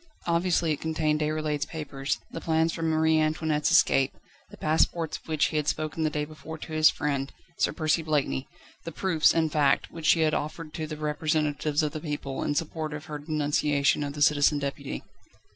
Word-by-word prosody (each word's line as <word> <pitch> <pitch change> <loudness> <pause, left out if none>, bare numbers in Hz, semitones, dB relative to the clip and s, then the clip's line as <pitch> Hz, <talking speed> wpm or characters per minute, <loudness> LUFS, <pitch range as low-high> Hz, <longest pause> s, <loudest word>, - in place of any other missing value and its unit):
Obviously 170 -1 +1
it 150 - -2
contained 155 -1 0
Déroulède's 150 -1 -1
papers, 140 -3 -3
the 165 - -6
plans 160 0 +1
for - - -5
Marie 160 0 +3
Antoinette's 155 -1 +1
escape, 135 0 +4 0.3
the - - -13
passports 160 +1 +1
of - - -24
which 155 -2 +1
he 155 - -2
had 150 -1 -1
spoken 155 +1 -2
the 155 - +2
day 150 -1 -2
before 155 +1 -9
to 160 - -9
his 155 0 +6
friend, 140 -2 -2 0.3
Sir - - +2
Percy 155 0 +1
Blakeney 150 -4 -1 0.4
the 165 - -6
proofs, 165 -1 +3
in 165 -1 +2
fact, 145 -2 +2
which 165 -2 -4
she 165 - +5
had 155 -1 +2
offered 155 +1 -4
to 155 -1 -4
the 155 0 -6
representatives 150 0 0
of 150 - 0
the 155 - -5
people, 145 -4 -4
in 145 - -1
support 155 0 -2
of 150 - -8
her 150 -1 -6
denunciation 145 -1 +1
of 140 -1 -4
the 145 0 +1
Citizen 145 -1 +4
Deputy. 140 0 -4
155 Hz, 195 wpm, -27 LUFS, 150-160 Hz, 0.4 s, his